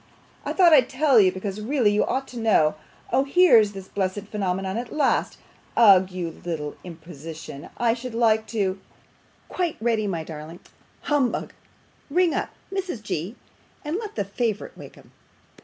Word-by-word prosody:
I - - -1
thought 350 -4 +6
I'd 260 -5 +5
tell 270 -2 +4
you, 190 -3 +5
because 195 +2 -5
really 240 -2 +2
you 210 - +3
ought 270 +1 -2
to 245 - -7
know. 205 -9 +3 0.4
Oh! 265 +2 +4
here's 275 - +5
this 195 -1 -9
blessed 195 0 -2
phenomenon 190 -2 -2
at 235 +1 -4
last. 305 -2 +1 0.4
Ugh, 195 -5 +7
you 180 -3 -6
little 155 -4 -4
imposition, 160 -3 -9
I 235 -1 +2
should 245 0 -7
like 220 -2 +2
to 195 -4 -1 0.7
quite 350 -4 -2
ready, 220 -2 0
my 170 -5 -2
darling, 160 +2 -9 0.4
humbug 285 -5 0 0.6
Ring 350 +2 +2
up, - - -2 0.2
Mrs. 365 - -4
G., 190 +2 -4 0.5
and 305 +4 -2
let 425 -1 -6
the 200 - -1
favourite 215 +1 -3
wake - - -12
'em. - - -18
215 Hz, 155 wpm, -24 LUFS, 185-260 Hz, 0.7 s, Ugh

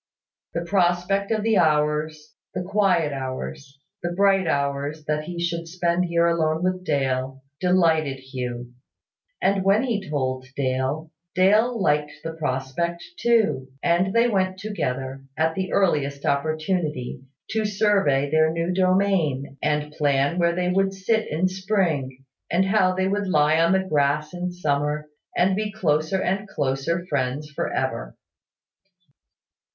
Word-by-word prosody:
The 170 0 -2
prospect 185 +2 +1
of 220 -2 0
the 220 -1 +3
hours, 150 -1 +1 0.2
the 180 - -2
quiet 185 -6 +2
hours, 130 - -6 0.2
the 175 -1 -2
bright 195 0 +3
hours 140 +2 -1
that 150 0 -1
he 175 +1 -6
should 170 -1 -2
spend 175 +1 0
here 170 -1 +2
alone 165 -1 +1
with 185 0 0
Dale, 135 -3 -1 0.2
delighted 165 -6 +2
Hugh: 125 -2 -6 0.7
and 195 0 +2
when 200 +4 +4
he 210 - -2
told 130 -3 -2
Dale, 135 +4 -1 0.2
Dale 215 +6 +4
liked 150 -4 +1
the 165 - -4
prospect 155 +3 -2 0.2
too; 220 - +2 0.2
and 175 +2 +2
they 230 +3 +4
went 190 -4 0
together, 135 -10 -4
at 160 +1 +2
the 190 +2 -3
earliest 145 -7 +1
opportunity, 155 -3 -1 0.3
to 220 0 0
survey 195 -9 +2
their 155 0 +4
new 165 +2 -1
domain, 185 -8 +1
and 150 0 0
plan 145 +2 +1
where 170 0 +2
they 180 0 0
would 195 +1 +1
sit 220 +3 0
in 165 +5 +1
spring, 175 -9 -1 0.2
and 180 +3 +2
how 190 -2 +3
they 190 0 +1
would 200 +1 -1
lie 155 -2 +3
on 165 +1 +4
the 190 0 +2
grass 150 0 +1
in 180 0 -3
summer, 150 -3 -1 0.3
and 185 +2 +3
be 210 +1 -2
closer 160 -2 0
and 195 +3 -1
closer 145 +3 -1
friends 145 -1 -2
for - - -3
ever. - - -3
165 Hz, 140 wpm, -24 LUFS, 145-190 Hz, 0.7 s, when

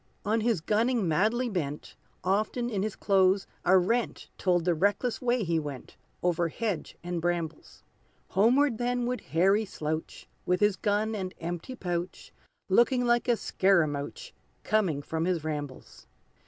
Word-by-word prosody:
On 220 +2 +1
his 220 -6 +1
gunning 220 +2 +1
madly 215 +10 +2
bent, 150 -9 -4 0.3
Often 215 +6 0
in 200 -3 -1
his 215 0 -2
clothes 190 -1 +3 0.2
a 190 - +5
rent 230 +7 0
Told 175 -3 +2
the 175 - +3
reckless 205 +8 0
way 245 -2 +1
he 165 -2 +1
went, 145 -4 -7 0.3
Over 175 -1 +2
hedge 200 0 -4
and 175 -1 -3
brambles. 170 -2 -3 0.5
Homeward 235 +5 +3
then 245 0 0
would 250 +1 -2
Harry 195 +6 +2
slouch, 160 -5 -5 0.2
With 180 0 +1
his 205 -2 +3
gun 210 +2 0
and 190 -3 -4
empty 175 +9 -5
pouch, 175 -4 -4 0.3
Looking 240 +5 +3
like 240 0 +2
a 240 -2 +3
scaramouch 185 - 0 0.3
Coming 185 -10 +1
from 160 +2 -2
his 175 -3 0
rambles. 145 -4 -6
195 Hz, 145 wpm, -28 LUFS, 170-230 Hz, 0.5 s, a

